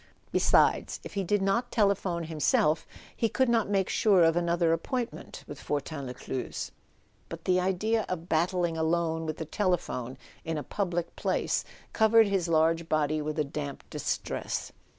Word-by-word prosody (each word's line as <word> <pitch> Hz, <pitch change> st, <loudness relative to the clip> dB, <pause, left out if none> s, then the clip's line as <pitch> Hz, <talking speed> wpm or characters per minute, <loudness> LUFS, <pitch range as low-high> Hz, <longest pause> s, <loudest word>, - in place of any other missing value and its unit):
Besides, -, -, +3 dB
if -, -, -9 dB
he 200 Hz, -1 st, -1 dB
did 200 Hz, +2 st, +1 dB
not 235 Hz, +6 st, +1 dB
telephone 195 Hz, -5 st, +1 dB
himself 155 Hz, 0 st, +1 dB, 0.3 s
he 230 Hz, -, +1 dB
could 260 Hz, +5 st, +2 dB
not 230 Hz, -3 st, +2 dB
make 195 Hz, -2 st, +1 dB
sure 195 Hz, -5 st, +4 dB
of 165 Hz, 0 st, +4 dB
another 170 Hz, -1 st, +2 dB
appointment 235 Hz, +8 st, -4 dB
with 145 Hz, -, -9 dB
Fortin 145 Hz, -1 st, -3 dB
Les 125 Hz, -, -5 dB
cluze. 125 Hz, +1 st, -5 dB, 0.6 s
But 165 Hz, 0 st, -8 dB
the 185 Hz, 0 st, +3 dB
idea 205 Hz, +4 st, 0 dB
of 175 Hz, -2 st, -4 dB
battling 175 Hz, 0 st, +1 dB
alone 160 Hz, 0 st, 0 dB
with 155 Hz, -, -3 dB
the 160 Hz, -, -4 dB
telephone 155 Hz, -, -1 dB, 0.3 s
in 165 Hz, -1 st, -3 dB
a 150 Hz, -, -3 dB
public 175 Hz, 0 st, -2 dB
place -, -, 0 dB, 0.3 s
covered 225 Hz, 0 st, +5 dB
his 195 Hz, -4 st, 0 dB
large 165 Hz, 0 st, +2 dB
body 155 Hz, 0 st, +1 dB
with 150 Hz, +1 st, -3 dB
a 155 Hz, -, +2 dB
damp 140 Hz, -1 st, -6 dB
distress. -, -, -3 dB
170 Hz, 160 wpm, -29 LUFS, 155-195 Hz, 0.6 s, covered